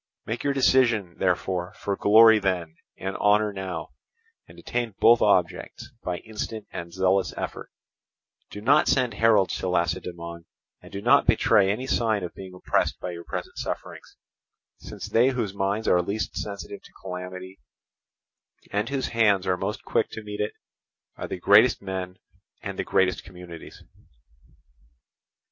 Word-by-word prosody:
Make 115 Hz, +2 st, -4 dB
your 140 Hz, -, +1 dB
decision, 120 Hz, -9 st, +3 dB
therefore, 90 Hz, +1 st, -1 dB
for 100 Hz, -, -3 dB
glory 110 Hz, +2 st, +7 dB
then 90 Hz, -5 st, -1 dB, 0.2 s
and 95 Hz, +1 st, -4 dB
honour 105 Hz, 0 st, +3 dB
now, 95 Hz, -4 st, -5 dB, 0.6 s
and -, -, -16 dB
attain 120 Hz, -4 st, -3 dB
both 120 Hz, 0 st, +6 dB
objects 90 Hz, -4 st, 0 dB
by 90 Hz, -1 st, -3 dB
instant 110 Hz, -1 st, -5 dB
and 85 Hz, 0 st, -7 dB
zealous 95 Hz, +1 st, +1 dB
effort: -, -, -5 dB, 0.8 s
do 105 Hz, -, -8 dB
not 140 Hz, +7 st, +4 dB
send 125 Hz, -4 st, +2 dB
heralds 105 Hz, -3 st, +3 dB
to 95 Hz, -, -2 dB
Lacedaemon, 85 Hz, -1 st, -3 dB, 0.4 s
and -, -, -14 dB
do 100 Hz, +1 st, -6 dB
not 140 Hz, +4 st, +5 dB
betray 105 Hz, -4 st, +4 dB
any 110 Hz, +6 st, -1 dB
sign 110 Hz, -6 st, 0 dB
of 90 Hz, -, -5 dB
being 95 Hz, -1 st, -10 dB
oppressed 90 Hz, -, 0 dB
by 90 Hz, -, -5 dB
your 85 Hz, 0 st, -8 dB
present -, -, -6 dB
sufferings, -, -, -6 dB, 0.6 s
since -, -, -8 dB
they 120 Hz, +3 st, +3 dB
whose 120 Hz, -7 st, -2 dB
minds 100 Hz, +2 st, -1 dB
are 90 Hz, -, +4 dB
least 100 Hz, +5 st, -3 dB
sensitive 100 Hz, 0 st, -6 dB
to -, -, -17 dB
calamity, 95 Hz, +1 st, -7 dB, 1.1 s
and 105 Hz, +3 st, -1 dB
whose 140 Hz, -1 st, -2 dB
hands 105 Hz, -5 st, +3 dB
are 90 Hz, -1 st, +2 dB
most -, -, -4 dB
quick -, -, 0 dB
to 110 Hz, -, -7 dB
meet 105 Hz, 0 st, -7 dB
it, 105 Hz, -, -2 dB, 0.6 s
are -, -, -6 dB
the -, -, -5 dB
greatest 100 Hz, +7 st, +5 dB
men 95 Hz, -1 st, -5 dB, 0.5 s
and -, -, -5 dB
the -, -, 0 dB
greatest 95 Hz, -1 st, +1 dB
communities." 90 Hz, -3 st, -11 dB
100 Hz, 150 wpm, -25 LUFS, 90-110 Hz, 1.1 s, glory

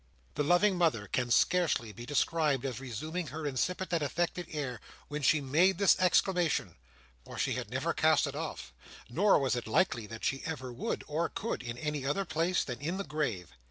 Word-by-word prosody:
The -, -, -1 dB
loving 175 Hz, +5 st, +3 dB
mother 155 Hz, -12 st, +2 dB
can 125 Hz, 0 st, -1 dB
scarcely 160 Hz, -5 st, +2 dB
be 120 Hz, +4 st, -10 dB
described 145 Hz, -2 st, +1 dB
as 130 Hz, -3 st, -3 dB
resuming 155 Hz, +7 st, -4 dB
her 155 Hz, +3 st, -6 dB
insipid 180 Hz, +7 st, -1 dB
and 165 Hz, -, +2 dB
affected 175 Hz, +4 st, -1 dB
air 130 Hz, -7 st, -4 dB, 0.3 s
when 150 Hz, 0 st, -4 dB
she 145 Hz, +2 st, +4 dB
made 165 Hz, +8 st, +3 dB
this 200 Hz, 0 st, +5 dB
exclamation; 175 Hz, -, +2 dB, 0.5 s
for -, -, -10 dB
she -, -, 0 dB
had -, -, -4 dB
never -, -, -1 dB
cast -, -, +3 dB
it -, -, -4 dB
off; -, -, -5 dB, 0.4 s
nor 195 Hz, +10 st, +4 dB
was 135 Hz, -3 st, +1 dB
it 120 Hz, -2 st, -4 dB
likely 115 Hz, -, +1 dB
that 115 Hz, +1 st, -9 dB
she 135 Hz, -, 0 dB
ever 130 Hz, -6 st, -5 dB
would 120 Hz, -, -3 dB
or 160 Hz, +3 st, -1 dB
could, 230 Hz, -, -3 dB
in 120 Hz, -1 st, -6 dB
any 150 Hz, 0 st, -3 dB
other 145 Hz, +9 st, 0 dB
place 170 Hz, +2 st, +1 dB
than 125 Hz, -1 st, -6 dB
in 170 Hz, +6 st, -2 dB
the 200 Hz, -, -2 dB
grave. 140 Hz, -, -3 dB
150 Hz, 195 wpm, -31 LUFS, 125-175 Hz, 0.5 s, this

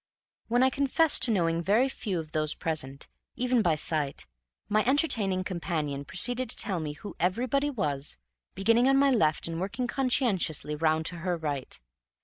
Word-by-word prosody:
When 245 Hz, +2 st, +2 dB
I 260 Hz, -, +3 dB
confessed 280 Hz, +3 st, +3 dB
to 240 Hz, -, +1 dB
knowing 170 Hz, -4 st, +1 dB
very 215 Hz, +9 st, +2 dB
few 210 Hz, -8 st, -4 dB
of 155 Hz, -1 st, -8 dB
those 155 Hz, -1 st, -1 dB
present, 145 Hz, -5 st, -5 dB, 0.3 s
even 250 Hz, -1 st, +1 dB
by 170 Hz, -6 st, +2 dB
sight, 150 Hz, -2 st, 0 dB, 0.4 s
my 215 Hz, 0 st, +2 dB
entertaining 230 Hz, -, +1 dB
companion 155 Hz, -6 st, -3 dB
proceeded 245 Hz, -, +1 dB
to -, -, 0 dB
tell 190 Hz, -4 st, 0 dB
me 150 Hz, -2 st, -4 dB
who 195 Hz, +5 st, -10 dB
everybody 250 Hz, -, 0 dB
was, 145 Hz, -, -2 dB, 0.4 s
beginning 230 Hz, +6 st, +3 dB
on 270 Hz, -, +4 dB
my 275 Hz, 0 st, +4 dB
left 155 Hz, -12 st, +1 dB
and 165 Hz, 0 st, -4 dB
working 235 Hz, +7 st, -3 dB
conscientiously 240 Hz, -, 0 dB
round 155 Hz, +1 st, 0 dB
to 180 Hz, -, -1 dB
her 175 Hz, 0 st, -2 dB
right. 145 Hz, -, -5 dB
185 Hz, 165 wpm, -28 LUFS, 155-245 Hz, 0.4 s, on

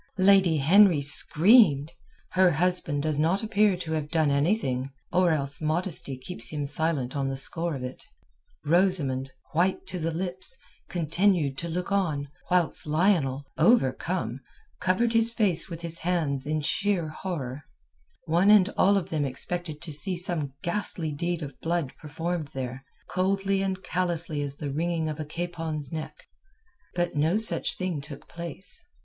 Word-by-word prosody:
Lady 190 Hz, -4 st, +5 dB
Henry 170 Hz, +1 st, +5 dB
screamed; 155 Hz, -, +5 dB, 0.4 s
her 185 Hz, -1 st, +4 dB
husband 170 Hz, -3 st, +1 dB
does 155 Hz, -2 st, 0 dB
not 170 Hz, +7 st, +1 dB
appear 210 Hz, -3 st, +2 dB
to 165 Hz, -3 st, -6 dB
have 155 Hz, -2 st, -2 dB
done 155 Hz, -2 st, +2 dB
anything, 140 Hz, -, 0 dB, 0.2 s
or 180 Hz, 0 st, +4 dB
else 140 Hz, -3 st, -2 dB
modesty 155 Hz, -3 st, -1 dB
keeps 130 Hz, +8 st, -3 dB
him 150 Hz, -2 st, -3 dB
silent 145 Hz, -3 st, -1 dB
on 140 Hz, -1 st, -1 dB
the 135 Hz, -, -3 dB
score 165 Hz, +4 st, +1 dB
of 130 Hz, -, -6 dB
it. 125 Hz, 0 st, -7 dB, 0.6 s
Rosamund, 150 Hz, -6 st, +1 dB, 0.2 s
white 180 Hz, +4 st, +1 dB
to 185 Hz, -, -4 dB
the 165 Hz, 0 st, -1 dB
lips, 185 Hz, +7 st, -3 dB, 0.3 s
continued 170 Hz, -3 st, +1 dB
to 170 Hz, -, -5 dB
look 180 Hz, +3 st, -4 dB
on, 155 Hz, -8 st, 0 dB, 0.2 s
whilst 180 Hz, -3 st, +1 dB
Lionel, 150 Hz, -5 st, +1 dB
overcome, 165 Hz, -, +2 dB, 0.4 s
covered 225 Hz, +6 st, +1 dB
his 230 Hz, 0 st, +6 dB
face 195 Hz, -8 st, +1 dB
with 170 Hz, -1 st, -7 dB
his 170 Hz, 0 st, 0 dB
hands 155 Hz, -6 st, -1 dB
in 155 Hz, 0 st, -1 dB
sheer 180 Hz, +1 st, 0 dB
horror. 145 Hz, -6 st, -5 dB, 0.6 s
One 175 Hz, +4 st, +3 dB
and 205 Hz, -2 st, +6 dB
all 200 Hz, -1 st, +3 dB
of 185 Hz, -, -4 dB
them 155 Hz, -2 st, 0 dB
expected 155 Hz, +4 st, -4 dB
to 155 Hz, -, -4 dB
see 180 Hz, +5 st, -3 dB
some 170 Hz, -6 st, -1 dB
ghastly 170 Hz, -3 st, -1 dB
deed 170 Hz, +3 st, -3 dB
of 140 Hz, -2 st, -9 dB
blood 165 Hz, -5 st, -1 dB
performed 160 Hz, +1 st, -4 dB
there, 130 Hz, 0 st, -5 dB, 0.2 s
coldly 195 Hz, +1 st, 0 dB
and 190 Hz, 0 st, -3 dB
callously 170 Hz, -5 st, -1 dB
as 140 Hz, -1 st, -3 dB
the 145 Hz, -1 st, -5 dB
wringing 165 Hz, +1 st, -1 dB
of 155 Hz, 0 st, -5 dB
a 155 Hz, -, -3 dB
capon's 160 Hz, -3 st, -4 dB
neck. 155 Hz, -1 st, -7 dB, 0.7 s
But 175 Hz, -1 st, -1 dB
no 160 Hz, +7 st, +2 dB
such 220 Hz, 0 st, +1 dB
thing 180 Hz, -6 st, -3 dB
took 140 Hz, -1 st, -10 dB
place. 170 Hz, -, -6 dB
165 Hz, 155 wpm, -26 LUFS, 145-185 Hz, 0.7 s, his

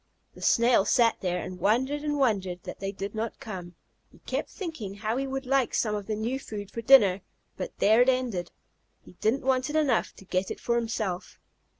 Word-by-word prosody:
The -, -, -14 dB
Snail 235 Hz, -3 st, +4 dB
sat 230 Hz, +2 st, +3 dB
there, 180 Hz, -1 st, 0 dB
and 180 Hz, 0 st, -6 dB
wondered 255 Hz, +10 st, +1 dB
and 295 Hz, -1 st, -1 dB
wondered 195 Hz, -9 st, 0 dB
that -, -, -8 dB
they 195 Hz, 0 st, -3 dB
did 200 Hz, 0 st, -6 dB
not 225 Hz, +1 st, -4 dB
come. 180 Hz, -5 st, -7 dB, 0.4 s
He -, -, -19 dB
kept -, -, -2 dB
thinking 315 Hz, -, -6 dB
how 215 Hz, +2 st, -2 dB
he 270 Hz, +1 st, -1 dB
would 270 Hz, 0 st, -4 dB
like 270 Hz, -1 st, +1 dB
some 215 Hz, -2 st, +1 dB
of 205 Hz, -2 st, -4 dB
the 215 Hz, -, -1 dB
new 235 Hz, +5 st, -2 dB
food 205 Hz, -6 st, -7 dB
for 230 Hz, -, -5 dB
dinner, 215 Hz, -6 st, +6 dB, 0.3 s
but -, -, -6 dB
there 220 Hz, +3 st, +5 dB
it 250 Hz, -, +5 dB
ended. 245 Hz, -9 st, -1 dB, 0.5 s
He -, -, -15 dB
didn't 250 Hz, +5 st, +1 dB
want 260 Hz, 0 st, +2 dB
it 300 Hz, -, -4 dB
enough 290 Hz, -7 st, +1 dB
to 195 Hz, -, -15 dB
get 185 Hz, +1 st, -1 dB
it -, -, -5 dB
for 235 Hz, -, 0 dB
himself. 220 Hz, -6 st, -2 dB
225 Hz, 210 wpm, -27 LUFS, 195-260 Hz, 0.5 s, dinner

